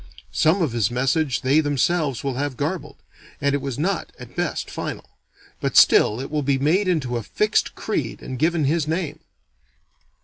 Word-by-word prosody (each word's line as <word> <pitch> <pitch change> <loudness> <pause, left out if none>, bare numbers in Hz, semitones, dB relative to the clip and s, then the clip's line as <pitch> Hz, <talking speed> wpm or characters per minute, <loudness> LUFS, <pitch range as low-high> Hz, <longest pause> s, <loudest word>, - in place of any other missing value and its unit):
Some 170 +4 +3
of 150 - 0
his 115 -3 +1
message 135 +3 0
they 135 +4 +3
themselves 145 -1 0
will 135 -1 -1
have 135 0 -3
garbled; 150 -1 -3 0.4
and 140 -1 +1
it 140 - 0
was 135 -3 -4
not, 180 +5 -1
at - - -11
best, - - -2
final; - - -5 0.5
but - - -1
still 110 - +6
it 135 - -6
will 150 -1 0
be 140 -1 +1
made 165 +9 +2
into 135 -9 0
a - - -3
fixed 210 - 0
creed - - -3
and 130 -1 -6
given 160 +1 +2
his 150 +2 +1
name. 160 -2 -2
145 Hz, 175 wpm, -23 LUFS, 135-160 Hz, 0.5 s, still